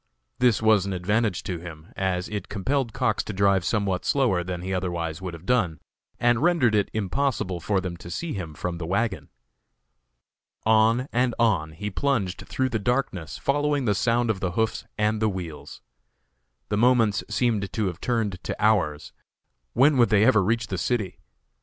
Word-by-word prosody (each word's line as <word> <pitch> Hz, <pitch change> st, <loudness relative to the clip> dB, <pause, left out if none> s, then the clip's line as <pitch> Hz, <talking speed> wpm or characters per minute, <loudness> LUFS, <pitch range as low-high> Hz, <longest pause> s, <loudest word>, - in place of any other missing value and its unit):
This 120 Hz, -3 st, +3 dB
was 110 Hz, -3 st, +4 dB
an 100 Hz, -, -2 dB
advantage 105 Hz, +2 st, 0 dB
to 90 Hz, -3 st, -4 dB
him, 80 Hz, -2 st, -11 dB
as 95 Hz, -1 st, -1 dB
it 105 Hz, -1 st, -5 dB
compelled 120 Hz, +5 st, -1 dB
Cox -, -, 0 dB
to -, -, -5 dB
drive 100 Hz, -1 st, +3 dB
somewhat 100 Hz, -2 st, 0 dB
slower 120 Hz, -11 st, +2 dB
than 90 Hz, 0 st, -5 dB
he 95 Hz, +1 st, -3 dB
otherwise 85 Hz, -3 st, -3 dB
would 90 Hz, -2 st, -5 dB
have 85 Hz, +2 st, -13 dB
done, 90 Hz, -, +1 dB, 0.4 s
and 120 Hz, 0 st, +3 dB
rendered 160 Hz, -9 st, +3 dB
it 105 Hz, -1 st, +2 dB
impossible 110 Hz, -3 st, -1 dB
for 100 Hz, +3 st, 0 dB
them 90 Hz, -2 st, -4 dB
to 85 Hz, -, -10 dB
see 160 Hz, -, -4 dB
him 85 Hz, -6 st, -6 dB
from 85 Hz, +2 st, -4 dB
the 80 Hz, -, -4 dB
wagon. 100 Hz, +2 st, -1 dB, 1.3 s
On 110 Hz, +3 st, +3 dB
and 120 Hz, 0 st, +1 dB
on 95 Hz, -10 st, +1 dB
he 105 Hz, +6 st, -5 dB
plunged 105 Hz, -7 st, -1 dB
through 130 Hz, 0 st, -1 dB
the 110 Hz, -2 st, -1 dB
darkness, 105 Hz, -, -2 dB
following 145 Hz, -1 st, 0 dB
the 105 Hz, -, +3 dB
sound 115 Hz, +2 st, +1 dB
of 100 Hz, -, -4 dB
the 95 Hz, -2 st, -2 dB
hoofs 110 Hz, +3 st, -1 dB
and 105 Hz, 0 st, +1 dB
the 110 Hz, -, +3 dB
wheels. 80 Hz, -7 st, -7 dB, 0.9 s
The 105 Hz, -, 0 dB
moments 115 Hz, -4 st, +3 dB
seemed 110 Hz, -6 st, 0 dB
to 110 Hz, -, -1 dB
have 90 Hz, -2 st, -4 dB
turned 110 Hz, -7 st, -1 dB
to -, -, -4 dB
hours; 90 Hz, -9 st, +1 dB, 0.6 s
when 140 Hz, +3 st, +4 dB
would 120 Hz, -3 st, +5 dB
they 105 Hz, 0 st, +4 dB
ever 110 Hz, -5 st, +5 dB
reach 115 Hz, +4 st, 0 dB
the 95 Hz, -4 st, -4 dB
city? 105 Hz, -2 st, -2 dB
105 Hz, 180 wpm, -25 LUFS, 90-120 Hz, 1.3 s, would